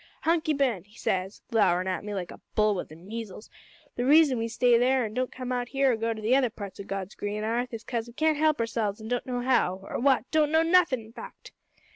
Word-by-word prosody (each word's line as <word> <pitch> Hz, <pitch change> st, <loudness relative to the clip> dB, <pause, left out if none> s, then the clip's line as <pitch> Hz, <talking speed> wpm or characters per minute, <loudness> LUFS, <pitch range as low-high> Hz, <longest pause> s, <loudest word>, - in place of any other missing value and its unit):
"`Hunky 315 Hz, -2 st, +2 dB
Ben,' 245 Hz, -11 st, +1 dB
says 190 Hz, -2 st, -3 dB
he, -, -, -15 dB
glowerin' 185 Hz, -5 st, +3 dB
at 185 Hz, -1 st, -2 dB
me 205 Hz, 0 st, -5 dB
like 180 Hz, -3 st, -4 dB
a -, -, -12 dB
bull 215 Hz, 0 st, +3 dB
wi' 185 Hz, -, -2 dB
the 155 Hz, -, -13 dB
measles, 210 Hz, +4 st, -8 dB, 0.4 s
`the 245 Hz, -, -2 dB
reason 295 Hz, -5 st, +5 dB
we 225 Hz, -, -1 dB
stay 240 Hz, +1 st, +3 dB
there 250 Hz, +1 st, +3 dB
an' 215 Hz, -, -6 dB
don't 255 Hz, +2 st, -2 dB
come 255 Hz, -1 st, -6 dB
out 245 Hz, -1 st, -1 dB
here 270 Hz, -1 st, +2 dB
or -, -, +1 dB
go 225 Hz, +1 st, -1 dB
to 220 Hz, -1 st, -5 dB
the 235 Hz, +4 st, +3 dB
other 265 Hz, -3 st, +3 dB
parts 200 Hz, -3 st, -9 dB
o' -, -, -5 dB
God's 195 Hz, -1 st, -5 dB
green 205 Hz, +1 st, -4 dB
'arth 240 Hz, +3 st, -1 dB
is 230 Hz, -1 st, -7 dB
'cause 235 Hz, -2 st, -3 dB
we 235 Hz, -, -12 dB
can't 310 Hz, +3 st, +1 dB
help 310 Hz, -2 st, +3 dB
ourselves 225 Hz, -2 st, -1 dB
an' 220 Hz, 0 st, -8 dB
don't 245 Hz, +1 st, -2 dB
know 245 Hz, -1 st, -2 dB
how 245 Hz, -7 st, +2 dB
or -, -, -5 dB
what 270 Hz, +1 st, +3 dB
don't 305 Hz, -1 st, +3 dB
know 320 Hz, 0 st, +4 dB
nothin' 330 Hz, -7 st, +3 dB
in 220 Hz, +1 st, -15 dB
fact!' 255 Hz, -, -11 dB
235 Hz, 250 wpm, -27 LUFS, 210-265 Hz, 0.4 s, reason